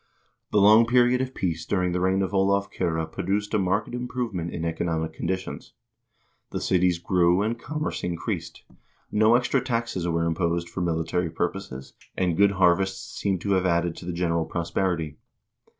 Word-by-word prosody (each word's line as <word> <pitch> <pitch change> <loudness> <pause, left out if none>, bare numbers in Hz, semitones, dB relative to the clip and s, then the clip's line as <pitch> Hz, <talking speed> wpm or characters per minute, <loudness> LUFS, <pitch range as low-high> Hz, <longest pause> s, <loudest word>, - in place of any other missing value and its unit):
The - - +2
long 105 +3 +7
period 125 +1 +4
of 130 0 -4
peace 80 -4 -2
during 90 -2 0
the 90 - -1
reign 95 +1 +2
of 95 - -3
Olav 100 +1 +2
Kyrre 80 -3 -1
produced 100 +6 -2
a 105 - +3
marked 95 +5 0
improvement 120 -8 -3
in 85 - -4
economic 80 -1 -2
conditions. 95 +3 -4 0.8
The - - -3
cities 90 -1 +2
grew, 90 +2 +2
and 115 +2 -2
commerce 150 +5 -4
increased; 85 -2 -4 0.5
no 110 +2 +4
extra 125 +2 +2
taxes 115 -8 -2
were 85 -1 0
imposed 85 0 -1
for 95 - -4
military 85 0 -1
purposes, 85 -5 -4 0.2
and 90 -3 +1
good 100 +2 +4
harvests 95 +1 +1
seem 95 -2 0
to 100 - -2
have 95 -1 +2
added 85 -1 +1
to - - -9
the - - -1
general 85 -1 0
pros 85 -1 -4
perity. 80 -6 -1
90 Hz, 165 wpm, -25 LUFS, 85-105 Hz, 0.8 s, long